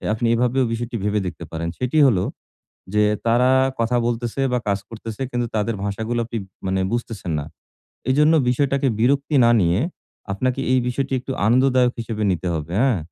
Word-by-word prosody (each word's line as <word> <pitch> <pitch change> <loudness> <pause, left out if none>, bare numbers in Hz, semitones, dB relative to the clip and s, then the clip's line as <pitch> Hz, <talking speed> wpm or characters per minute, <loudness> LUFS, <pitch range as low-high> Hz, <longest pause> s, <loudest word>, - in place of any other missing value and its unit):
যে - - -6
আপনি 115 +2 -1
এভাবেও 125 +2 +2
বিষয়টি 120 +1 -3
ভেবে 105 0 +1
দেখতে 90 -1 -6
পারেন 85 0 -3
সেটি 125 +5 0
হলো, 100 -9 +2 0.7
যে 105 - +4 0.2
তারা 120 +2 +4 0.3
কথা 115 +2 +1
বলতেছে 120 +2 -2
বা 125 - +2
কাজ 100 -1 +1
করতেছে 115 +1 -7
কিন্তু 120 -1 -1
তাদের 110 +1 0
ভাষাগুলো 110 +4 -2
আপনি 115 0 -4 0.3
মানে 95 0 0
বুঝতেছেন 115 -7 -3
না। - - -5 0.7
এজন্য 150 +4 +4
বিষয়টাকে 140 +2 +1
বিরক্তি 140 +4 +2
না 115 - +5
নিয়ে, 85 +2 +2 0.5
আপনাকে 130 +6 -1
এই 130 - +4
বিষয়টি 135 +2 -2
একটু 135 - -5
আনন্দদায়ক 125 +1 +3
হিসেবে 110 -2 -4
নিতে 90 0 -1
হবে, 80 +1 -4
হ্যাঁ? 125 -7 +3
120 Hz, 170 wpm, -22 LUFS, 105-130 Hz, 0.7 s, না